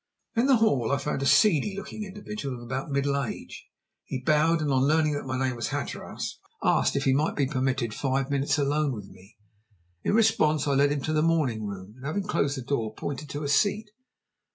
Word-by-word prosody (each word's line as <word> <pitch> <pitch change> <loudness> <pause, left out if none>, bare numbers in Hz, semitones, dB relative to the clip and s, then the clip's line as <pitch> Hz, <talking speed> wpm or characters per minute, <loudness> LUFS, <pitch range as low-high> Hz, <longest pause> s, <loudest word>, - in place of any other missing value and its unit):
In 235 +3 +3
the 270 - +6
hall 140 - +2
I 140 - +3
found 140 0 -2
a 140 - +1
seedy 170 +6 +4
looking 210 +2 -6
individual 205 -8 -6
of 120 - -9
about 130 +4 -4
middle 140 0 +1
age. 120 - -7 0.4
He 130 - -4
bowed, 155 +4 +3
and 150 -2 0
on 130 +1 +3
learning 155 0 +3
that 145 -2 -4
my 130 0 -2
name 130 -1 0
was 115 - -3
Hatteras, - - -5 0.2
asked - - +3
if 140 - 0
he 135 - +3
might 150 +4 +1
be 140 - +2
permitted 130 -4 -1
five 135 +1 -1
minutes 140 +2 +1
alone 145 0 +1
with 105 -4 -8
me. 95 +5 -18 0.7
In - - +1
response, 210 - +3
I 140 - +2
led 140 +1 +4
him 145 -1 -1
to 155 - -1
the 155 - +2
morning 145 -10 +1
room, 100 0 -8
and 130 - -14
having 195 +7 -1
closed 145 -7 0
the 130 - -5
door, 115 -5 -2
pointed 145 +1 -5
to 145 +2 -4
a - - -2
seat. 205 +9 +1
140 Hz, 215 wpm, -27 LUFS, 130-155 Hz, 0.7 s, the